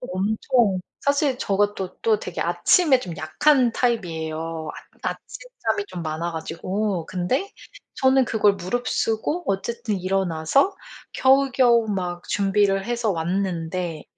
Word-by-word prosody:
또 250 - -8
엄청 210 +1 +1 0.2
사실 280 -2 +1
제가 205 -1 +1
또 185 -1 -6
또 220 -2 +3
되게 180 -4 -6
아침에 250 - +3
좀 175 -8 -7
약한 250 - +3
타입이에요. 165 -9 -2 0.3
아 - - 0
아침잠이 - - -4
좀 175 - -6
많아 160 +2 -3
가지고. 180 +3 -3
근데 190 - -1 0.4
저는 265 0 +4
그걸 210 -3 +3
무릅쓰고 225 - -1
어쨌든 205 +1 -2
일어나서 185 - +1 0.4
겨우겨우 260 -4 +4
막 180 -3 -3
준비를 195 -1 +2
해서 235 -2 0
왔는데 170 -1 -2
200 Hz, 265 characters per minute, -23 LUFS, 175-245 Hz, 0.4 s, 저는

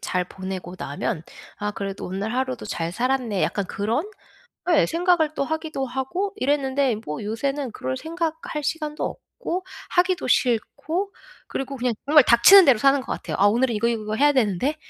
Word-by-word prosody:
잘 180 -1 -1
보내고 185 -1 -7
나면 155 +5 -3 0.3
'아 210 0 -2
그래도 195 -1 -5
오늘 195 +5 -3
하루도 255 -2 -2
잘 170 -3 -3
살았네.' 245 -4 0
약간 200 -2 -1
그런? 230 - -2 0.6
예 320 - +5
생각을 335 -2 +2
또 - - 0
하기도 315 -2 -3
하고 265 +11 -2
이랬는데 270 -2 +1
뭐 150 +5 -4
요새는 265 +4 -2
그럴 130 0 -3
생각할 325 -2 -4
시간도 305 0 -3
없고 370 -6 -5 0.2
하기도 365 -2 +1
싫고 310 - 0 0.4
그리고 270 +1 -4
그냥 250 -2 0
정말 295 -1 +7
닥치는 240 +14 +8
대로 250 -6 +5
사는 275 0 +4
것 - - -7
같아요. - - -4
'아 200 - +5
오늘은 235 +2 +2
이거 230 +3 +1
이거 230 -2 -1
이거 215 +1 -3
해야 290 +4 +4
되는데.' 255 - +1
260 Hz, 360 characters per minute, -23 LUFS, 215-305 Hz, 0.6 s, 닥치는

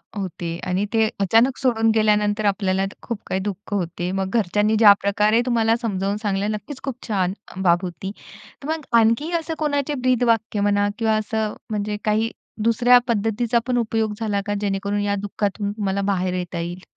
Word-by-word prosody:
होते 175 -4 -4
आणि 185 +3 0
ते 220 -1 +3
अचानक 225 +7 +3
सोडून 225 -4 +2
गेल्यानंतर 210 -1 +2
आपल्याला 195 -1 +1 0.2
खूप 235 -4 -5
काही 190 - -1
दुःख 205 +1 -5
होते. 175 -2 -2
मग 190 0 -2
घरच्यांनी 210 +2 +1
ज्या 210 -3 +9
प्रकारे 210 +3 +2
तुम्हाला 230 -2 +2
समजावून 200 -2 -1
सांगितलं. 205 -1 -1
नक्कीच 215 +7 -8
खूप 270 -3 -3
छान 190 -4 0 0.3
बाब 175 -1 +4
होती. 185 +2 -5 0.5
तर - - -6
मग 315 -2 -2
आणखी 230 +9 +2
असं 325 0 -5
कोणाचे 290 -1 0
ब्रीदवाक्य 245 -4 +1
म्हणा 205 0 +2
किंवा 220 -1 +2
असं 215 0 -2 0.2
म्हणजे 210 -1 -2
काही 220 +2 +1 0.3
दुसऱ्या 240 +2 +5
पद्धतीचा 230 +1 +1
पण 250 -1 +1
उपयोग 225 -2 0
झाला 210 -3 -1
का, 205 - -1
जेणेकरून 200 0 -1
या 205 0 0
दुःखातून 205 0 -2
तुम्हाला 200 -2 -2
बाहेर 185 -1 -1
येता 180 -1 -3
येईल? 175 +2 -5
210 Hz, 165 wpm, -22 LUFS, 195-225 Hz, 0.5 s, ज्या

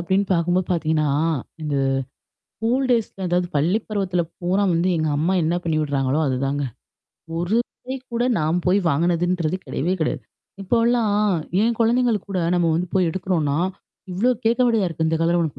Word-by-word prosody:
அப்படின்னு 190 +4 +1
பாக்கும்போது 175 +1 +1
பார்த்திங்கன்னா, 155 -3 +1 0.5
அது 145 -2 -1 0.8
கூல் 250 +4 +1
டேய்ஸ் 230 -3 +2 0.2
அதாவது 175 0 +1
பள்ளி 175 +9 +2
பருவத்தில 190 -4 -1 0.2
பூரா 185 +3 +1
வந்து, 170 +2 +1
எங்க 155 0 0
அம்மா 165 +5 +1
என்ன 160 +2 +1
பண்ணி 160 -2 0
விட்றாங்களோ, 140 0 0
அதுதாங்க. 135 +2 -1 0.7
ஒரு 175 +6 0 0.3
டைம் 260 0 -5
கூட 240 +1 +1
நான் 160 +3 +1
போய் 190 +3 +4
வாங்கினதுன்றது 170 +2 +1
கிடையவே 155 +7 -1
கிடையாது. 155 - -1 0.4
இப்போலாம் 230 0 +2 0.4
என் 230 +1 +1
குழந்தைங்களுக்கு 230 -2 +2
கூட, 185 -2 0
நம்ம 170 -2 +2
வந்து 175 +2 -1
போய் 185 -3 +3
எடுக்குறோம்னா, 165 -6 -1 0.6
இவ்வளோ 210 +8 +2
கேக்க 235 +3 +2
வேண்டிதா 225 -5 +2
இருக்கு. 160 0 -2
இந்த 160 - +1
கலர் 170 +1 +2
உனக்கு 155 -5 -2
175 Hz, 155 wpm, -22 LUFS, 160-205 Hz, 0.8 s, போய்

